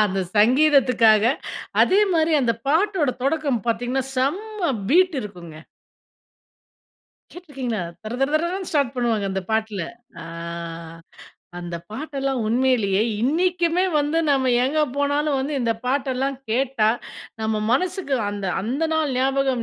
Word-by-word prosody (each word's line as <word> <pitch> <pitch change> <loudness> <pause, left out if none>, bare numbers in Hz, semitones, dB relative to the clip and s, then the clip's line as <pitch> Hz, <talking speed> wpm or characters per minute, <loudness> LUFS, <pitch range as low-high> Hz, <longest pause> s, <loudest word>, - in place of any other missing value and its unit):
அந்த 195 -1 -1 0.2
சங்கீதத்துக்காக, 245 -3 +5 0.6
அதேமாதிரி 365 -5 +3
அந்த 235 -2 +2
பாட்டோட 325 0 +2
தொடக்கம் 280 -5 0
பாத்தீங்கன்னா, 245 +3 -1
செம்ம 365 +7 -1 0.2
பீட் 360 +3 +4
இருக்குங்க. 175 -6 -9 1.8
கேட்டுருக்கீங்களா? 270 - -5 0.2
தர, 220 +3 -5
தர, 270 - +2
தரன்னு, 365 +2 -3
ஸ்டார்ட் 280 -5 +1
பண்ணுவாங்க 225 -5 0
அந்த 190 0 -2
பாட்டுல. 220 -3 -1 0.4
அ - - -9 1.3
அந்த 175 -1 -5
பாட்டெல்லாம் 275 0 -3
உண்மையிலேயே 225 -4 +2 0.2
இன்னைக்குமே 345 +5 +1
வந்து 295 +3 0
நம்ப 270 -2 +2 0.2
எங்க 305 +4 +1 0.2
போனாலும் 285 0 +1
வந்து 275 +3 -2
இந்த 230 -2 +1
பாட்டெல்லாம் 265 0 -1
கேட்டா, 245 -2 +1 0.5
நம்ம 220 -1 0
மனசுக்கு, 360 0 0 0.2
அந்த, 200 -1 -4 0.2
அந்த 265 +9 -1
நாள் 305 -4 0
ஞாபகம் 265 -2 +1
270 Hz, 115 wpm, -22 LUFS, 230-310 Hz, 1.8 s, சங்கீதத்துக்காக